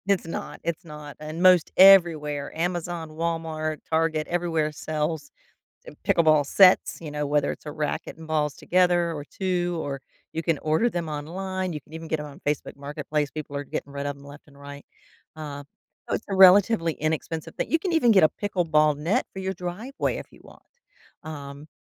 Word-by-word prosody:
It's 200 -4 +1
not, 165 - -6
it's 170 +2 -3
not, 150 -3 -10
and 155 +3 -5
most 180 -2 +6
everywhere, 160 -7 +6
Amazon, 175 -1 -2
Walmart, 160 -1 -3
Target, 160 -1 +1
everywhere 165 -3 0
sells, 155 - -3 0.6
eh, - - -9
pickleball 155 -3 +4
sets, 185 +4 +5
you 160 -3 -7
know? 150 0 -2
Whether 145 0 +1
it's - - -8
a 150 - -5
racket 150 0 -3
and 160 0 -12
balls 150 -2 0
together 175 -1 +2
or 145 -3 -6
2, 175 0 -2
or 140 -1 -4 0.3
you 165 - -3
can 165 -4 +1
order 155 +11 +1
them 175 -7 -3
online, 185 +5 -4
you 150 - -5
can 150 - -23
even 165 0 -7
get 160 -1 -2
'em 150 - -6
on 145 -1 -12
Facebook 150 0 -2
Marketplace. 145 +1 -3
People 150 -2 -6
are 140 - -3
getting 140 0 -5
rid 140 0 -4
of 145 - -2
them 140 0 -16
left 145 +1 -13
and 140 -2 -19
right. 140 0 -10 0.5
Uh, 145 -2 -7 0.5
it's - - -2
a - - 0
relatively 190 -2 +6
inexpensive 160 +1 -3
thing - - -3
you 325 - +3
can 350 +2 -3
even 260 -8 +4
get 195 -6 +6
a - - +6
pickleball 155 -7 +1
net 185 - +1
for - - -8
your 190 0 -2
driveway 180 +10 -3
if - - -8
you - - -18
want. - - -16 0.6
Um 145 -1 -8
160 Hz, 190 wpm, -25 LUFS, 150-175 Hz, 0.6 s, most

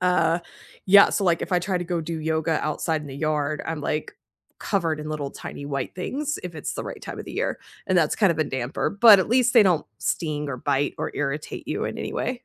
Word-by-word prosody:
uh 180 -2 +3 0.5
yeah, 200 +1 +8
so 200 - 0
like, 170 -2 +2
if - - -4
I 180 - +4
try 185 +1 -1
to 175 - -4
go 175 -1 -1
do 165 0 -4
yoga 160 +1 0
outside 155 +1 -1
in - - -9
the 135 - -8
yard, 150 -1 -1
I'm, 160 -2 -3
like, 150 - -2 0.4
covered 165 -6 -1
in 150 - -6
little, 145 -2 -3
tiny 140 - -8
white 140 -2 -3
things, 280 +11 -3
if 180 -2 -6
it's 155 - -4
the - - -4
right - - -7
time - - -7
of - - -7
the - - -7
year, - - -2 0.3
and 185 -1 +3
that's 155 -2 +2
kind 195 -6 +4
of 160 - -8
a 155 - +2
damper, 130 -1 -2
but 205 -1 +8
at 190 - 0
least 250 +1 +3
they 230 -4 +8
don't 180 -5 +2
sting 150 -3 -2
or 130 - -3
bite 135 +3 0
or - - -2
irritate 145 +1 -4
you - - -2
in - - -4
any - - -4
way. 255 - -1
160 Hz, 245 wpm, -24 LUFS, 150-185 Hz, 0.5 s, yeah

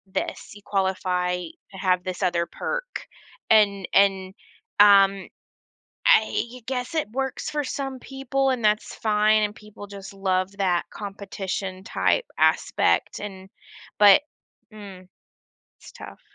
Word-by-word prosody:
This. 190 - -5
You 205 - -13
qualify 185 -2 0
to 180 +2 -11
have 185 -2 +1
this 185 +1 -4
other 175 -2 +1
perk. - - -5 0.4
And 200 -3 +4
and, 195 -1 +3 0.5
um, 195 -1 +6 0.8
I 255 - +2
guess 255 +5 -4
it 310 -8 -1
works 265 +3 -3
for 300 -1 -2
some 270 -1 -5
people, 270 +1 -2
and 255 -3 -1
that's 210 +1 +1
fine, 215 0 +2
and 210 0 -2
people 210 -1 -12
just 200 -1 -10
love 190 -1 -1
that 180 -3 0
competition-type 195 - -3
aspect - - +1
and 190 -2 -8 0.5
but 205 +6 +8 0.5
mm, 195 -3 -11 0.7
it's - - -14
tough. - - -12
200 Hz, 120 wpm, -24 LUFS, 190-235 Hz, 0.8 s, but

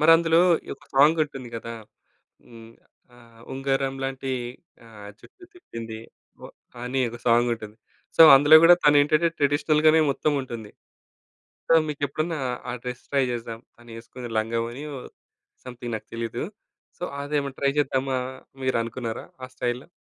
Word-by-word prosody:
మరందులో 165 +1 +5 0.3
ఈ - - -15
ఒక - - -22
సాంగ్ 150 +4 +5
ఉంటుంది 135 -4 -10
కదా! 115 +1 -7 0.7
హ్మ్. 115 -1 -14 0.4
ఆహ్, 115 -1 -19
ఉంగరం 135 0 -1
లాంటి 135 0 -4 0.6
ఆహ్, 105 -2 -12
జుట్టు 370 -2 -17
తిప్పింది. 115 - -9 0.4
ఓహ్, - - -12 0.3
అని 125 +2 -2
ఒక 120 - -9
సాంగ్ 120 +1 +4
ఉంటుంది. 110 -1 -11 0.4
సో - - +9
అందులో 145 +3 +7
కూడా 175 +1 +9
తను 145 0 +6
ఏంటంటే, 155 +3 +2
ట్రెడిషనల్ 145 +1 +1
గానే 160 +1 +6
మొత్తం 150 +2 0
ఉంటుంది. 115 -4 -8 1.0
సో - - +6
మీకు 150 -1 -6
ఎప్పుడన్నా, 155 +3 -3 0.3
ఆ - - -3
డ్రెస్ 125 -1 -6
ట్రై 140 -1 +2
చేద్దాం, 115 -1 -5 0.2
తను 120 0 -15
వేసుకున్న 120 +1 -9
లంగా 115 +1 -1
ఓణి 130 +5 -8
ఓహ్, 125 - -10 0.6
సమ్‌థింగ్ 120 -1 -7
నాకు 110 - -17
తెలీదు. 115 +1 -4 0.6
సో - - -6 0.2
అదేమన్నా 140 -1 -3
ట్రై 140 0 +3
చేద్దామా, 135 -2 0 0.4
మీరు 130 -1 +1
అనుకున్నారా 115 0 -6 0.2
ఆ - - -12
స్టైల్‌లో? 125 +1 -3
130 Hz, 150 wpm, -24 LUFS, 115-145 Hz, 1.0 s, సో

